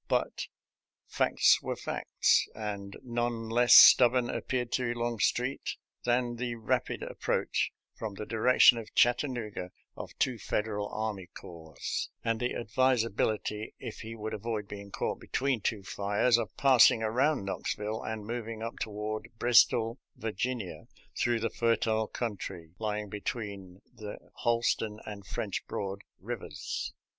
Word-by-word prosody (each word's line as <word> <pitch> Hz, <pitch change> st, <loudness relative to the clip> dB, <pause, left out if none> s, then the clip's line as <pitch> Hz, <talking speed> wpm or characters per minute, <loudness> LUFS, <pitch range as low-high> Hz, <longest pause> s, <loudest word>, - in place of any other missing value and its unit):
But -, -, -1 dB, 0.6 s
facts -, -, +3 dB
were -, -, -3 dB
facts, -, -, +1 dB
and 100 Hz, -2 st, -5 dB
none 120 Hz, -2 st, -2 dB
less 120 Hz, +1 st, +6 dB
stubborn 125 Hz, -1 st, +8 dB
appeared 125 Hz, -2 st, -2 dB
to 120 Hz, -2 st, 0 dB
Longstreet 120 Hz, +2 st, -1 dB, 0.3 s
than 120 Hz, 0 st, +1 dB
the 120 Hz, -1 st, -3 dB
rapid 110 Hz, -2 st, -1 dB
approach -, -, -1 dB, 0.2 s
from 110 Hz, -3 st, -6 dB
the 105 Hz, -, -6 dB
direction 120 Hz, +1 st, +5 dB
of 110 Hz, -1 st, -11 dB
Chattanooga 120 Hz, -7 st, +1 dB, 0.3 s
of -, -, -9 dB
two 125 Hz, -3 st, 0 dB
Federal 105 Hz, 0 st, -2 dB
army 105 Hz, -4 st, -4 dB
corps, 80 Hz, -5 st, -12 dB, 0.5 s
and 115 Hz, -1 st, 0 dB
the 125 Hz, -, -1 dB
advisability, 115 Hz, -3 st, 0 dB
if -, -, -7 dB
he 115 Hz, 0 st, -7 dB
would 110 Hz, 0 st, -5 dB
avoid 110 Hz, -1 st, -3 dB
being 100 Hz, -1 st, -8 dB
caught -, -, -3 dB
between 130 Hz, -4 st, -1 dB
two 105 Hz, -1 st, -1 dB
fires, 105 Hz, +5 st, +2 dB
of 115 Hz, -, -5 dB
passing 125 Hz, -4 st, +6 dB
around 125 Hz, +2 st, +1 dB
Knoxville 105 Hz, +2 st, -3 dB
and 110 Hz, -2 st, -5 dB
moving 115 Hz, -1 st, -5 dB
up 115 Hz, -, -5 dB
toward 105 Hz, 0 st, -4 dB
Bristol, 120 Hz, 0 st, +4 dB, 0.2 s
Virginia, 110 Hz, -1 st, -4 dB, 0.3 s
through 120 Hz, -1 st, +1 dB
the 115 Hz, -, -1 dB
fertile 110 Hz, -1 st, +1 dB
country 95 Hz, -8 st, -5 dB
lying 105 Hz, -1 st, -2 dB
between 100 Hz, -2 st, -6 dB
the 105 Hz, -1 st, -7 dB, 0.2 s
Holston 115 Hz, -2 st, 0 dB
and 100 Hz, -2 st, -8 dB
French -, -, -3 dB
Broad 100 Hz, 0 st, -4 dB, 0.2 s
rivers. 100 Hz, -7 st, -5 dB
110 Hz, 130 wpm, -30 LUFS, 105-120 Hz, 0.6 s, stubborn